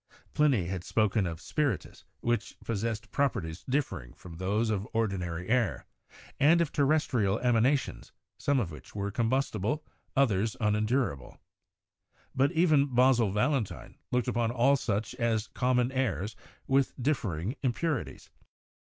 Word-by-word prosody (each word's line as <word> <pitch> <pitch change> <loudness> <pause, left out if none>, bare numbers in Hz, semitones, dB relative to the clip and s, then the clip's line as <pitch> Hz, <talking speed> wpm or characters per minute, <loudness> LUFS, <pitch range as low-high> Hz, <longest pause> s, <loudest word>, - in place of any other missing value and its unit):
Pliny 140 - +3
had 90 0 -4
spoken 105 -1 +1
of 80 -1 -5
"spiritus," 135 - -2 0.2
which 120 -3 -1
possessed 110 -1 -3
properties 90 -12 -1
differing 125 - -2
from 85 -2 -12
those 105 +5 0
of 100 0 -2
ordinary 90 -6 -1
air; 120 -2 +1 0.5
and 160 +5 +5
of 170 -3 +1
terrestrial 135 -8 +2
emanations, 125 +3 +1 0.3
some 140 -1 +2
of 95 -9 -2
which 75 +4 -12
were 100 0 -2
com 115 +2 0
bustible, 135 +1 0 0.3
others 110 -6 +2
unendurable. 105 - 0 1.0
But 135 +3 +2
even 150 -6 +3
Basil 125 -3 +4
Valentine 110 +2 -1 0.2
looked 125 0 +1
upon 120 -2 +1
all 125 +4 +3
such 110 -4 -2
as 115 -2 0
common 125 0 +1
airs 110 - -1 0.3
with 135 0 +2
differing 115 - -1
im 130 - +2
purities. 160 -1 -3
115 Hz, 130 wpm, -29 LUFS, 100-135 Hz, 1.0 s, and